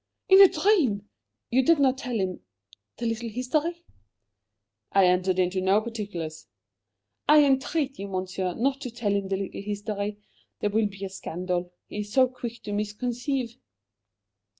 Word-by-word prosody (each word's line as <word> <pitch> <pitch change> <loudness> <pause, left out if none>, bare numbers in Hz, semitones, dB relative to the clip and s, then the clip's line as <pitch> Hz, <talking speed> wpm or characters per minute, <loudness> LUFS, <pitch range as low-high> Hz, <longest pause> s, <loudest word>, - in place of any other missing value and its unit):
"In 385 +1 +9
a 390 - +11
dream! 275 - +2 0.4
You 260 +2 +4
did 335 +5 +5
not 265 -2 +2
tell 250 -3 -4
him 185 -1 -2 0.6
the 235 - -4
little 230 0 -2
history?" 305 +9 -2 1.1
"I 195 -1 +5
entered 180 +1 +2
into 185 +1 +1
no 190 +2 +4
particulars." 200 -9 -6 0.8
"I 300 0 +8
entreat 275 0 0
you, 200 - -4
Monsieur, 185 -1 -3
not 275 +3 0
to 255 - -4
tell 230 -3 -2
him 200 -1 0
the 195 0 -1
little 195 0 -5
history. 205 0 -3 0.4
There 205 - 0
will 215 0 +2
be 195 -1 -7
a - - -5
scandal; 180 -1 -3
he 210 - -7
is 205 0 -5
so 260 -1 +5
quick 245 -2 -7
to 205 - -4
misconceive." 240 +4 -2
210 Hz, 155 wpm, -26 LUFS, 195-255 Hz, 1.1 s, a